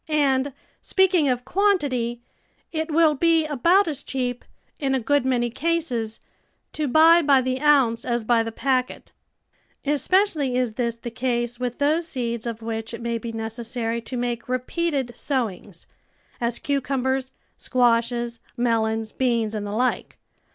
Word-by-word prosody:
And, 280 -2 +2 0.3
speaking 370 -6 +3
of 250 -1 -1
quantity, 275 - 0 0.5
it 320 0 -2
will 315 0 +4
be 325 +2 +3
about 335 +7 +3
as 290 -4 -3
cheap, 250 -2 -3 0.4
in 270 -2 0
a - - +1
good 280 +3 +1
many 240 -2 +1
cases, 260 -8 -2 0.5
to 305 -1 -2
buy 325 +5 +6
by 280 -3 +5
the 260 +1 -2
ounce 265 -6 +4
as 240 -1 -1
by 230 +1 +3
the 225 0 -3
packet; 255 +1 -1 0.7
especially 295 -2 +2
is 250 -3 0
this 235 0 -2
the 235 0 -7
case 240 0 -2
with 245 -1 -3
those 310 +4 +1
seeds 235 -5 -3
of 230 -1 -5
which 225 0 -4
it 230 - -10
may 235 -1 -1
be 230 +1 -6
necessary 230 +1 -3
to 250 +2 -6
make 240 0 -3
repeated 260 0 -1
sowings 215 - -3 0.3
— - - -35
as 235 0 -1
cucumbers, 265 -1 -1 0.2
squashes, 235 -1 +1 0.2
melons, 225 -2 0
beans, 235 -4 0
and 210 -1 -3
the - - -5
like. 245 +4 -1
250 Hz, 150 wpm, -24 LUFS, 235-285 Hz, 0.7 s, buy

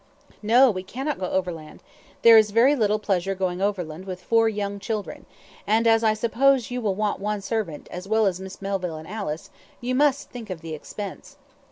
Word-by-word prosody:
"No; 240 +4 +5
we 185 -2 -4
cannot 265 +10 -4
go 185 - -2
overland; 170 -5 -4 0.4
there 230 -1 +9
is 215 -1 +6
very 235 +7 +4
little 215 -4 +2
pleasure 195 -2 -1
going 185 -1 -2
overland 185 -4 -2
with 185 -2 -6
four 225 +4 +2
young 200 -1 -3
children, 210 +1 -5 0.4
and 225 +2 +3
as 225 0 +4
I 215 -1 +3
suppose 245 +3 +2
you 250 0 -2
will 205 -4 0
want 210 0 -1
one 210 0 -2
servant, 195 -7 -3
as 180 +2 -7
well 220 +1 +3
as 185 -2 0
Miss 190 +1 -9
Melville 190 -4 -2
and 155 +1 -10
Alice, 190 -7 -5 0.3
you 250 +1 -2
must 280 +1 +2
think 235 -4 -8
of 180 -4 -6
the 165 -1 -6
expense." 195 +6 -8
205 Hz, 195 wpm, -24 LUFS, 185-225 Hz, 0.4 s, there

